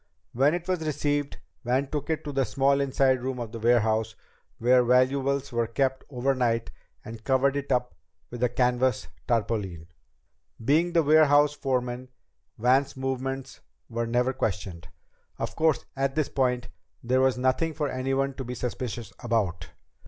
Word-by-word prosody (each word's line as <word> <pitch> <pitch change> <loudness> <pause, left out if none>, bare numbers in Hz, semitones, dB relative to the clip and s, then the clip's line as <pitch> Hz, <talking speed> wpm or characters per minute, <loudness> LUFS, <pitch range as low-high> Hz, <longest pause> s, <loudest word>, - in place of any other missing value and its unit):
When 140 +7 +3
it 175 0 -5
was 180 -3 -1
received, 145 -1 -1 0.3
Van 130 +3 +1
took 145 +2 -4
it 160 - -1
to 145 - -5
the 135 -1 +1
small 140 +1 +2
inside 130 -1 +2
room 130 0 -3
of 120 -3 -5
the 115 - -6
warehouse 110 -1 +2 0.4
where 125 +2 +4
valuables 135 +3 +2
were 115 -1 0
kept 130 +3 0
overnight 125 -3 0 0.3
and 115 -1 -9
covered 135 +2 +2
it 140 -1 -3
up 125 -5 0 0.4
with 120 0 -7
a 125 - +3
canvas 125 +1 +1 0.2
tarpaulin. 105 -7 -1 0.8
Being 165 +6 +3
the 165 -2 +4
warehouse 150 -1 +5
foreman, 125 -3 -2 0.5
Van's 130 +4 +2
movements 135 0 -4 0.3
were 115 0 -2
never 125 +2 +1
questioned. 95 -8 -3 0.5
Of - - -4
course, 160 -2 +1
at 135 0 -1
this 155 -2 0
point, 125 -2 0 0.3
there 130 +2 +2
was 130 -1 +3
nothing 130 +5 0
for 150 -2 -1
anyone 135 +1 -1
to 135 - -4
be 125 0 -6
suspicious 120 -2 -5
about. 95 -8 -1
130 Hz, 150 wpm, -27 LUFS, 120-140 Hz, 0.8 s, warehouse